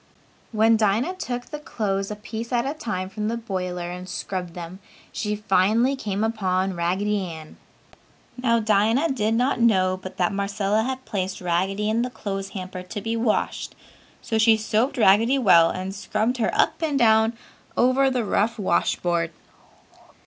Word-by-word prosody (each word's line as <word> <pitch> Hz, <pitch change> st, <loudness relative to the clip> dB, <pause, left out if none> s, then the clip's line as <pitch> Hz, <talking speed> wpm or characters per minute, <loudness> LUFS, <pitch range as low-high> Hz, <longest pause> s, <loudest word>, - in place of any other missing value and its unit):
When 225 Hz, 0 st, +4 dB
Dinah 220 Hz, -, +1 dB
took 245 Hz, -7 st, -4 dB
the 300 Hz, -, -7 dB
clothes 195 Hz, -8 st, -2 dB
a 210 Hz, -, -4 dB
piece 225 Hz, +2 st, -7 dB
at 240 Hz, 0 st, +1 dB
a 275 Hz, -, -1 dB
time 215 Hz, -12 st, -4 dB
from 210 Hz, +2 st, -4 dB
the 230 Hz, +1 st, -1 dB
boiler 180 Hz, -5 st, -4 dB
and 180 Hz, +1 st, -8 dB
scrubbed 180 Hz, -2 st, -5 dB
them, 175 Hz, +1 st, -8 dB, 0.3 s
she 210 Hz, -1 st, -2 dB
finally 215 Hz, +6 st, +2 dB
came 210 Hz, -5 st, -3 dB
upon 190 Hz, -4 st, 0 dB
Raggedy 190 Hz, +4 st, 0 dB
Ann. 160 Hz, -3 st, -9 dB, 0.8 s
Now 235 Hz, -2 st, +2 dB
Dinah 220 Hz, +8 st, +2 dB
did 225 Hz, -3 st, 0 dB
not 250 Hz, +2 st, +1 dB
know 185 Hz, -5 st, +3 dB
but 185 Hz, 0 st, -9 dB
that 180 Hz, +1 st, +1 dB
Marcella 200 Hz, +1 st, 0 dB
had 260 Hz, +2 st, -4 dB
placed 190 Hz, -1 st, -3 dB
Raggedy 190 Hz, +4 st, 0 dB
in 220 Hz, +2 st, +1 dB
the 250 Hz, -, -1 dB
clothes 195 Hz, -5 st, -5 dB
hamper 185 Hz, -1 st, -6 dB
to 180 Hz, +4 st, -6 dB
be 225 Hz, +2 st, -3 dB
washed, 230 Hz, -1 st, -1 dB, 0.5 s
so 220 Hz, -, -1 dB
she 220 Hz, 0 st, +5 dB
soaped 220 Hz, +5 st, 0 dB
Raggedy 225 Hz, +5 st, +4 dB
well 170 Hz, -9 st, +6 dB
and 185 Hz, +1 st, -4 dB
scrubbed 215 Hz, +5 st, -1 dB
her 225 Hz, -3 st, +1 dB
up -, -, +1 dB
and 305 Hz, -3 st, 0 dB
down 220 Hz, -2 st, +4 dB, 0.4 s
over 260 Hz, +2 st, +4 dB
the 250 Hz, -3 st, -1 dB
rough 220 Hz, +3 st, +1 dB
wash 190 Hz, -5 st, +1 dB
board. 170 Hz, -2 st, -1 dB
210 Hz, 165 wpm, -24 LUFS, 190-235 Hz, 0.8 s, well